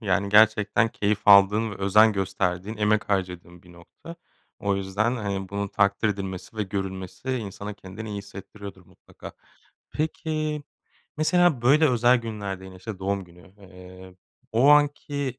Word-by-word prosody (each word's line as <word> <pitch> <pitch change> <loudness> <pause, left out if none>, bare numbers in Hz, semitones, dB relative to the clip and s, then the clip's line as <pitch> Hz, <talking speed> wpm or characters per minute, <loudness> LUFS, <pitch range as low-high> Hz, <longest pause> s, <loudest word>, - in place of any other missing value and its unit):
yani 100 -2 0
gerçekten 105 +1 +4
keyif 105 -1 -1
aldığın 105 +3 +6
ve - - -7
özen 105 +3 +4
gösterdiğin 95 +1 -2
emek 105 0 +1
harcadığın 90 -2 -3
bir 90 - -17
nokta. 85 - -13 0.4
O 100 -1 -1
yüzden, 100 +5 -1
hani, 100 -4 -4
bunun 100 +1 -3
takdir 100 +2 +1
edilmesi 95 0 -6
ve 110 - -1
görülmesi 95 +4 -5
insana 105 -4 -5
kendini 100 +3 -10
iyi 105 -1 -5
hissettiriyordur 100 -1 -11
mutlaka. - - -14 0.6
Peki, 155 -1 -3 0.5
mesela 160 -3 +2
böyle 150 +5 +4
özel 120 0 +4
günlerde 100 -5 -6
yine, 95 -1 -11
işte, 95 +2 -8
doğum 100 0 -2
günü, 90 +1 -19
eee, 95 -1 -14 0.4
o 125 +5 +4
anki 145 -2 +2
100 Hz, 140 wpm, -25 LUFS, 95-115 Hz, 0.6 s, aldığın